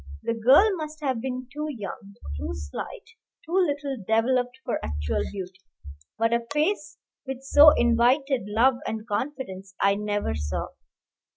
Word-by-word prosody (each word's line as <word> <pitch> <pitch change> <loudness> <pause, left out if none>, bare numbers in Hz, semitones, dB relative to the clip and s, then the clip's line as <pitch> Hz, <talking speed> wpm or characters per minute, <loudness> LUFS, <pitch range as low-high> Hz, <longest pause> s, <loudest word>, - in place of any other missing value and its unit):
The 230 - 0
girl 255 - +6
must 310 -1 -6
have 260 -5 -1
been 255 0 -4
too 300 +1 -3
young, 200 -5 -7 0.2
too 75 -1 -4
slight, 70 0 -7 0.4
too 320 - -11
little 290 -7 +1
developed 245 +3 +1
for - - -2
actual 75 0 -2
beauty; 190 -1 -7 0.6
but 225 +1 +2
a 235 0 0
face 295 - 0 0.3
which 265 -1 -5
so 290 +3 +8
invited 245 +1 +3
love 240 +5 +3
and 220 0 -4
confidence 205 -5 -4
I 200 0 +4
never 205 - -1
saw. 75 -1 -3
235 Hz, 145 wpm, -26 LUFS, 200-270 Hz, 0.6 s, so